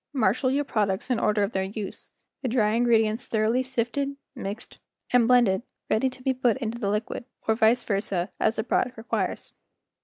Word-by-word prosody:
Marshal 255 +1 +2
your 280 +2 +1
products 210 -2 -1
in 245 - +2
the - - -2
order 210 -1 +3
of 200 - -1
their 190 - 0
use, 195 +1 -6 0.3
the 260 - -2
dry 220 -3 +2
in¬ 240 +1 +2
gredients 225 +2 +2
thoroughly 225 +3 +2
sifted, 260 +2 -2 0.2
mixed, 200 +3 -7 0.3
and 240 -2 +5
blended 235 -6 +4 0.3
ready 260 +4 +3
to 255 0 -14
be 265 - +2
put 245 -2 +1
into 235 -2 -4
the 200 -4 -1
liquid, 210 +4 -2 0.2
or 220 - +4
vice 225 +2 +3
versa, 195 -3 -1
as 220 - +2
the 220 - -1
product 245 +1 0
requires. 225 +2 -3
225 Hz, 190 wpm, -26 LUFS, 210-250 Hz, 0.3 s, and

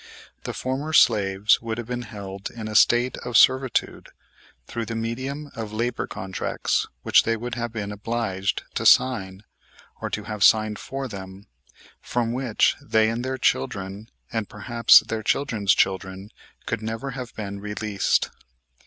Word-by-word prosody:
The - - -3
former 135 +5 -3
slaves 105 -5 +4
would 115 -1 -4
have 120 - -4
been 125 +1 -4
held 100 -3 -7
in 110 -2 -7
a 110 - -5
state 120 +4 +4
of 120 -2 0
servitude 130 +1 +3 0.6
through 115 -2 -5
the 115 - -4
medium 130 +6 -4
of 110 -2 -5
labor 120 +3 -2
contracts 95 0 -2 0.2
which - - +5
they 115 0 0
would 120 +2 -5
have 120 0 -3
been 105 -3 -4
obliged 105 -2 -2
to - - -3
sign, 95 -6 +3 0.6
or - - -3
to - - -3
have 105 -2 -3
signed 110 -1 +4
for 135 0 -5
them, 95 -2 -9 0.6
from 120 -1 -1
which 125 -3 +2
they, 110 0 +2
and 115 +2 -3
their 130 0 -2
children, 95 - -1 0.2
and, 110 -3 -2
perhaps, 115 +3 +5
their 110 -1 -4
children's 110 -4 +1
children 95 +1 -1 0.3
could - - -2
never 115 +5 -4
have 125 -2 -7
been 100 -2 -5
released. 105 0 -1
110 Hz, 155 wpm, -24 LUFS, 100-120 Hz, 0.6 s, which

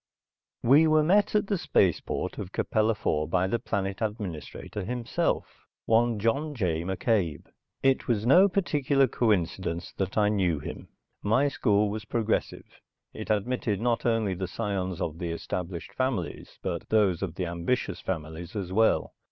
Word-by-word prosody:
We 145 +7 +6
were 155 0 +4
met 205 +6 +3
at 210 - +3
the 195 -2 -1
space 95 - +3
port - - -4
of 95 -2 -6
Capella 110 +2 +1
IV 75 -6 -1
by 90 +2 +2
the 115 +5 0
planet 100 -3 -3
administrator, 105 -2 -4
himself, 120 +3 -1 0.4
one 115 0 +3
John 140 +8 0
J. 85 -8 0
McCabe. 95 - 0 0.4
It 135 -1 +2
was 110 -3 +1
no 180 +10 +7
particular 145 -7 +2
coincidence 95 -7 -1
that 95 +1 -2
I 105 -1 +4
knew 95 -6 +1
him. - - -7 0.3
My 125 +8 +3
school 105 -6 +2
was 110 +1 -5
progressive. 110 0 -2 0.3
It - - -7
admitted 110 0 0
not 120 +1 0
only 115 -4 +1
the 95 +1 -3
scions 95 -5 -3
of 80 0 -3
the 85 - -3
established 85 +1 -5
families 120 - -3
but 85 -3 -4
those 100 -6 +3
of 95 -4 -3
the 90 - -2
ambitious 85 +9 -2
families 80 +1 -5
as 95 -3 -4
well. 110 +2 +2
105 Hz, 155 wpm, -27 LUFS, 90-120 Hz, 0.4 s, no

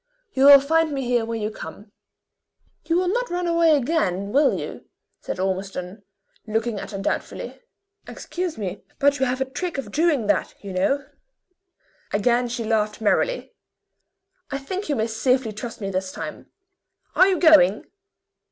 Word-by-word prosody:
You 265 +1 +3
will 280 0 +11
find 320 +3 +1
me 270 -2 -2
here 240 -2 +1
when 225 -1 -4
you 210 - -2
come." 210 0 -10 0.9
"You 330 - +1
will 365 +1 +2
not - - 0
run 355 0 -2
away 335 -2 +4
again, 205 - -1
will 280 +3 +3
you?" - - -8 0.3
said - - -5
Ormiston, 190 0 -3 0.5
looking 220 0 -1
at - - -7
her 200 - -5
doubtfully. 195 - -4 0.5
"Excuse 355 -2 -5
me; 195 -5 -5 0.2
but 285 0 +3
you 265 - +2
have 255 +1 -2
a - - +2
trick 335 +5 -4
of 240 -7 -5
doing 305 -6 +2
that, 205 - 0
you 195 -2 -6
know." 270 +10 +1 1.1
Again 240 +4 +2
she 235 0 -4
laughed 215 -1 0
merrily. - - 0 1.0
"I 275 - -2
think 370 +8 -5
you 290 - +1
may 220 -3 0
safely 235 +1 +1
trust 215 +2 -7
me 195 -1 -3
this 185 0 -2
time. - - -7 0.7
Are 370 - +6
you 380 -2 +2
going?" 305 - +5
245 Hz, 160 wpm, -23 LUFS, 210-305 Hz, 1.1 s, will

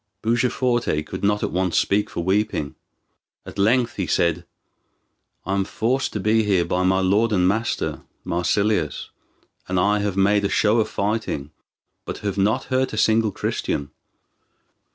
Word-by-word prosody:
Bujaforte 120 -7 0
could - - -7
not 105 +1 +1
at - - -1
once 90 -1 0
speak 105 +1 +1
for 85 - -4
weeping. 95 -5 0 0.7
At - - -9
length 115 +4 +2
he 95 -4 -2
said: 85 +2 0 1.0
"I 95 - -2
am 100 0 +1
forced 125 +7 -1
to 105 - -2
be 110 +3 +2
here 95 -5 +2
by 90 - -1
my 95 +1 +2
lord 105 +5 +2
and 90 -3 +3
master, 110 +5 -1 0.2
Marsilius; 90 -1 0 0.6
and 90 0 0
I 105 +3 +2
have 100 -2 -2
made 100 +1 +3
a 100 - +1
show 110 +2 +2
of 110 - 0
fighting, 100 -9 -2 0.5
but - - -6
have 100 - -1
not 105 +3 +2
hurt 130 -1 +1
a - - -4
single 110 0 +3
Christian. 70 -6 -3
100 Hz, 155 wpm, -22 LUFS, 90-110 Hz, 1.0 s, and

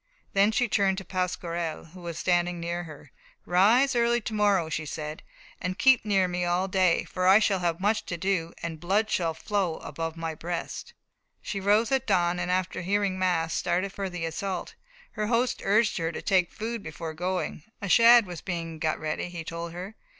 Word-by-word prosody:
Then 200 +2 +4
she 245 +3 +1
turned 195 -3 +2
to 190 - -6
Pasquerel, 175 -3 -3
who 185 - -11
was 170 -2 -6
standing 175 -1 +1
near. 170 -5 -6 0.3
"Rise 230 +10 +4
early 235 0 +3
to 220 - -5
morrow," 205 -5 +2
she 160 0 -3
said, 150 0 -6 0.4
"and 185 0 -3
keep 265 -2 +5
near 195 -3 +2
me 180 0 -2
all 175 +2 +1
day, 185 -3 +2
for 185 0 -2
I 190 +2 +8
shall 205 -3 +2
have 170 -1 -1
much 215 +3 0
to 170 - -3
do, 170 -2 -1
and 165 -2 -4
blood 205 +6 +1
shall 165 -3 0
flow 190 -3 -1
above 165 +2 -5
my 165 -1 -3
breast." 170 +2 -5 0.5
She 200 - -3
rose 210 +4 +3
at 265 -1 +1
dawn, 175 0 +2
and 180 0 -2
after 185 0 -1
hearing 195 0 0
mass, 165 -3 +1
started 185 +3 -1
for 195 -1 -3
the 175 -2 -4
assault. 185 +4 -4 0.4
Her 210 - -2
host 240 +2 +1
urged 215 +2 +3
her 165 0 -1
to - - -6
take 185 -3 +2
food 230 +1 -4
before 160 -1 -6
going; 180 0 -3 0.2
a 200 - -4
shad 235 +3 +7
was 175 -3 -7
being 165 -3 -4
got 155 -1 0
ready, 155 +3 -3
he 170 -2 -6
told 170 +1 -5
her. 185 +5 -7
180 Hz, 195 wpm, -27 LUFS, 170-200 Hz, 0.5 s, I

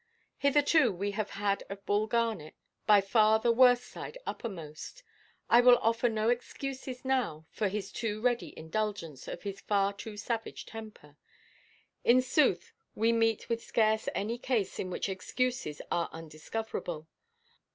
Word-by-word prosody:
Hitherto 290 -2 +4
we 200 +2 -2
have 210 +1 -3
had 200 0 -1
of 200 0 -8
Bull 205 +1 +1
Garnet 220 -9 -1 0.3
by 210 -2 +7
far 215 +2 +4
the 235 +2 +2
worse 245 +1 +6
side - - -8
uppermost. 175 - -7 0.4
I 235 - +7
will 245 0 +8
offer 230 +2 +2
no 220 0 0
excuses 260 +1 -4
now 250 -13 0
for 215 - 0
his 195 0 -4
too 215 -2 -3
ready 240 +1 0
indulgence 165 -3 -4
of - - -6
his 200 -1 -5
far 200 -1 +1
too 210 +1 -8
savage 225 +1 -4
temper. 215 -10 -11 0.9
In 245 +2 +6
sooth, 255 - +2 0.2
we 225 +2 +3
meet 225 -1 +1
with 230 0 -1
scarce 220 -1 +2
any 230 +4 -2
case 230 -7 -1
in 185 - -2
which 180 - -2
excuses 195 - -2
are 170 - 0
undiscoverable. 160 +1 -5
220 Hz, 145 wpm, -30 LUFS, 195-240 Hz, 0.9 s, will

